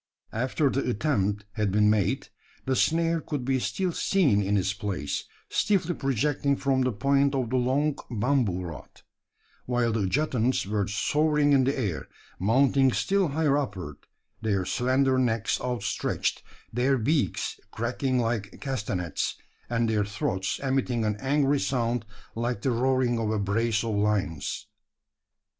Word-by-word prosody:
After 130 +5 +1
the 135 -1 -1
attempt 105 -5 0
had 105 -1 -1
been 105 +1 +4
made, 105 -3 +1 0.4
the 130 - +1
snare 165 +3 +2
could 145 -6 -4
be 130 0 +1
still 185 +7 -1
seen 155 - +2
in 100 +1 +1
its 95 0 0
place, 100 -8 -3 0.2
stiffly 185 -4 +1
projecting 140 +1 0
from 135 -1 +1
the 130 0 +2
point 140 +5 +2
of 125 -3 -1
the 130 - +2
long 135 +4 +1
bamboo 115 -5 +1
rod; 85 -3 -10 0.6
while 120 -1 +1
the 110 -3 0
adjutants 130 -1 +1
were 100 -1 -1
soaring 150 +7 +2
in 135 -2 +4
the 135 +2 0
air, 100 -11 -2 0.3
mounting 130 +6 +4
still 195 +7 +1
higher 150 -1 +1
upward, 95 - -5 0.4
their 100 -4 0
slender 130 +1 +2
necks 115 -4 0
outstretched, 125 -1 -1 0.3
their 130 +3 +2
beaks 140 +5 0
cracking 125 +3 -1
like 115 -4 -2
castanets, 105 - -2 0.3
and 115 -1 +1
their 110 -2 +1
throats 95 -2 -2
emitting 130 -4 0
an 105 -1 0
angry 140 +2 +2
sound 120 -4 -1 0.3
like 120 -2 -2
the 130 - +2
roaring 125 0 +1
of 110 -1 -1
a 110 - 0
brace 110 +3 0
of 115 -2 -2
lions. 100 -7 -1
125 Hz, 145 wpm, -27 LUFS, 105-135 Hz, 0.6 s, been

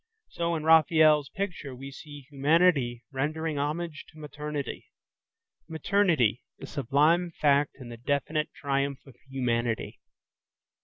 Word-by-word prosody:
So 170 0 -1
in 155 - -3
Raphael's 155 -2 +5
picture 175 -7 -5
we 135 +2 -9
see 145 -1 -11
humanity 140 -4 +2
rendering 150 +2 -2
homage 155 +2 -3
to 155 - -18
maternity,–maternity, 150 - -3 0.2
the - - -9
sublime 150 +6 +2
fact 145 -1 +3
in 125 -3 -9
the 120 - -8
definite 145 +5 -1
triumph 140 -1 -2
of 135 - -15
humanity. 120 -3 -2
145 Hz, 110 wpm, -28 LUFS, 135-160 Hz, 0.2 s, Raphael's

